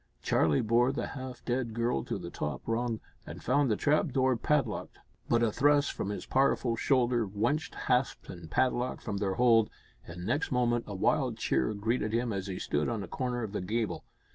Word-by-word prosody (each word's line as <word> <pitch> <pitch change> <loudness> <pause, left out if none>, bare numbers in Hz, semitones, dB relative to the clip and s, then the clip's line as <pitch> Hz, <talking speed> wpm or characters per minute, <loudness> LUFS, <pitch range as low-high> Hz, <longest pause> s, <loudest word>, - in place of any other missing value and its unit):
Charlie 75 -3 +2
bore 120 +3 +3
the 140 - -3
half 130 -2 -8
dead 120 -2 -1
girl 115 - 0
to - - -3
the - - -7
top 75 -2 -4
rung, 115 0 -1 0.3
and - - -8
found 145 -2 +2
the 105 - +3
trap 150 +8 +2
door 130 -1 +2
padlocked, 145 +4 -1 0.3
but 120 0 +3
a 115 - +2
thrust 145 +4 +3
from 100 - -3
his 105 - -4
powerful 130 -3 +2
shoulder 120 -2 +2
wrenched 110 +10 -1
hasp 125 0 0
and 85 -3 -9
padlock 125 +5 0
from 100 - -3
their 95 -1 -1
hold, 115 -3 +4 0.4
and 90 +1 -7
next 145 - 0
moment 120 -2 +1
a 100 - -5
wild 95 - +1
cheer 65 - +1
greeted 110 +1 -1
him 115 -1 0
as 95 0 -3
he 95 -2 -4
stood 75 +1 -1
on 110 -4 -2
a - - -7
corner 125 -2 -2
of 105 - -4
the 105 - -3
gable. 110 +4 -2
120 Hz, 195 wpm, -30 LUFS, 105-130 Hz, 0.4 s, hold